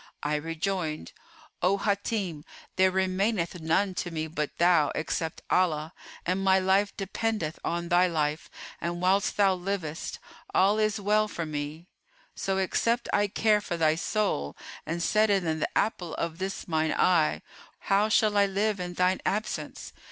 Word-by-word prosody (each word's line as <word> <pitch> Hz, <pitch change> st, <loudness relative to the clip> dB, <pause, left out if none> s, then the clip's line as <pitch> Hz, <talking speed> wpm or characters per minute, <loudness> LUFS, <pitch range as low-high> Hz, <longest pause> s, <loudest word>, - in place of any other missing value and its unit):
I 145 Hz, +1 st, 0 dB
rejoined, 165 Hz, +1 st, -3 dB, 0.5 s
'O 190 Hz, +3 st, +3 dB
Hátim,[FN#423] 200 Hz, -5 st, -1 dB, 0.3 s
there 185 Hz, 0 st, +5 dB
remaineth 190 Hz, -1 st, 0 dB
none 185 Hz, +5 st, +1 dB
to 180 Hz, -, -3 dB
me 160 Hz, -2 st, -3 dB
but 150 Hz, -2 st, -4 dB
thou, 170 Hz, -4 st, +4 dB
except 160 Hz, +1 st, -3 dB
Allah; 160 Hz, -3 st, +1 dB, 0.3 s
and 185 Hz, +2 st, 0 dB
my 190 Hz, 0 st, +5 dB
life 190 Hz, +2 st, +2 dB
dependeth 200 Hz, -4 st, -2 dB
on 170 Hz, 0 st, -2 dB
thy 180 Hz, +1 st, +5 dB
life 155 Hz, -2 st, -1 dB, 0.3 s
and 170 Hz, 0 st, -2 dB
whilst 190 Hz, +3 st, +2 dB
thou 200 Hz, -2 st, +5 dB
livest, 180 Hz, -4 st, -4 dB, 0.4 s
all 200 Hz, +3 st, +4 dB
is 215 Hz, 0 st, +1 dB
well 210 Hz, +1 st, +2 dB
for 170 Hz, -5 st, -4 dB
me; 150 Hz, +2 st, -5 dB, 0.5 s
so, 195 Hz, 0 st, -2 dB
except 230 Hz, +5 st, 0 dB
I 205 Hz, 0 st, +3 dB
care 210 Hz, +1 st, +2 dB
for 175 Hz, -3 st, -4 dB
thy 155 Hz, -2 st, +3 dB
soul 165 Hz, -, -1 dB, 0.3 s
and 170 Hz, +2 st, -2 dB
set 215 Hz, +3 st, +3 dB
it 195 Hz, -2 st, +2 dB
in 160 Hz, -2 st, -1 dB
the -, -, -2 dB
apple 180 Hz, -6 st, -1 dB
of 170 Hz, 0 st, -3 dB
this 190 Hz, +1 st, -4 dB
mine 160 Hz, -2 st, +1 dB
eye, 160 Hz, -, +2 dB, 0.4 s
how 200 Hz, +2 st, +2 dB
shall 215 Hz, -1 st, +3 dB
I 200 Hz, 0 st, +5 dB
live 200 Hz, +1 st, 0 dB
in 180 Hz, 0 st, -5 dB
thine 185 Hz, +1 st, +2 dB
absence? 215 Hz, +2 st, -3 dB
185 Hz, 160 wpm, -28 LUFS, 165-200 Hz, 0.5 s, there